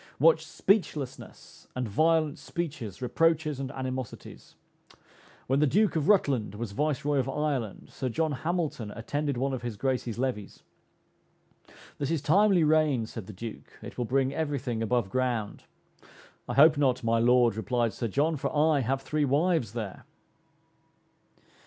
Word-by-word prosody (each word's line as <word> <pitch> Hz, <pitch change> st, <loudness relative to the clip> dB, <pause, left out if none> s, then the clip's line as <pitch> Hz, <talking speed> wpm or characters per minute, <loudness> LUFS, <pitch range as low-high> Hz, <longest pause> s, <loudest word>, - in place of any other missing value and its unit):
What 160 Hz, +2 st, +5 dB
speechlessness 155 Hz, -, -2 dB
and 125 Hz, -2 st, -2 dB
violent 155 Hz, +5 st, +2 dB
speeches, 140 Hz, -, -5 dB
reproaches 155 Hz, +1 st, +1 dB
and 135 Hz, -1 st, -3 dB
animosities! 130 Hz, -2 st, -6 dB, 0.9 s
When 135 Hz, +2 st, +1 dB
the 150 Hz, -, +4 dB
Duke 205 Hz, +8 st, +2 dB
of 155 Hz, -2 st, 0 dB
Rutland 135 Hz, -, +2 dB
was 115 Hz, -1 st, -5 dB
Viceroy 145 Hz, +3 st, 0 dB
of 130 Hz, 0 st, -1 dB
Ireland, 135 Hz, -7 st, -3 dB
Sir 130 Hz, -, -3 dB
John 160 Hz, +6 st, 0 dB
Hamilton 155 Hz, -5 st, -2 dB
attended 140 Hz, +5 st, -3 dB
one 135 Hz, +2 st, -1 dB
of 130 Hz, -, -3 dB
his 120 Hz, -3 st, -5 dB
Grace's 125 Hz, -2 st, -2 dB
levees. 120 Hz, -5 st, -3 dB, 1.4 s
"This 140 Hz, -, -1 dB
is 165 Hz, -1 st, +1 dB
timely 190 Hz, +2 st, +4 dB
rain," 150 Hz, -6 st, +3 dB
said 110 Hz, -3 st, -8 dB
the -, -, -7 dB
Duke, 110 Hz, +4 st, -9 dB
"it -, -, -9 dB
will 120 Hz, -, 0 dB
bring 135 Hz, +2 st, +1 dB
every 145 Hz, -2 st, -1 dB
thing 120 Hz, -3 st, -3 dB
above 115 Hz, -3 st, 0 dB
ground." 120 Hz, -4 st, -2 dB, 0.8 s
"I -, -, -2 dB
hope 150 Hz, +1 st, +6 dB
not, 130 Hz, -3 st, +2 dB
my 115 Hz, 0 st, +2 dB
Lord," 120 Hz, -1 st, +4 dB
replied 115 Hz, +1 st, 0 dB
Sir 115 Hz, -, -3 dB
John, 150 Hz, +8 st, +1 dB
"for -, -, -2 dB
I 150 Hz, -1 st, +4 dB
have 135 Hz, +2 st, -1 dB
three 155 Hz, +1 st, 0 dB
wives 145 Hz, -, +1 dB
there." 110 Hz, -5 st, -6 dB
135 Hz, 150 wpm, -28 LUFS, 120-155 Hz, 1.4 s, hope